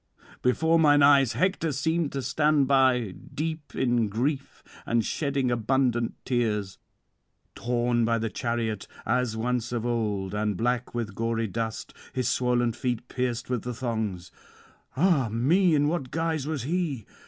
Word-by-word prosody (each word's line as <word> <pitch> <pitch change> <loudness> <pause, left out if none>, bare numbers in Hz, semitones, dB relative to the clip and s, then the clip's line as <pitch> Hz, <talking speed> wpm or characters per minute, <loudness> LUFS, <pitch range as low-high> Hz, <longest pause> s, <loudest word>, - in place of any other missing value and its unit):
before 160 +6 +3
mine 145 -2 +5
eyes 140 -4 +5
Hector 165 - 0
seemed 160 +3 0
to 135 -1 -3
stand 145 +1 +2
by, 130 -6 +3 0.2
deep 155 0 -4
in 120 -4 +1
grief 135 +6 -2 0.2
and 115 -2 +1
shedding 140 -4 -1
abundant 120 0 +1
tears; 105 -6 -1 0.7
torn 120 0 0
by 115 0 +2
the 115 0 -1
chariot, 115 -3 -2 0.2
as 125 -3 0
once 120 0 -1
of 120 -1 -2
old, 105 -5 -1
and 105 -2 -1
black 120 +2 -1
with 115 -4 -3
gory 115 +1 -1
dust, 110 +1 -4 0.2
his 130 -2 -1
swoln 125 -1 +1
feet 125 0 -3
pierced 125 -2 -2
with 125 -3 -1
the 125 +2 -5
thongs. 110 -7 -3 0.7
Ah 150 -7 +3
me! 155 - +3
in 145 0 +3
what 150 -5 -2
guise 160 -2 -1
was 155 -6 -2
he! 155 - -2
125 Hz, 145 wpm, -27 LUFS, 115-140 Hz, 0.7 s, mine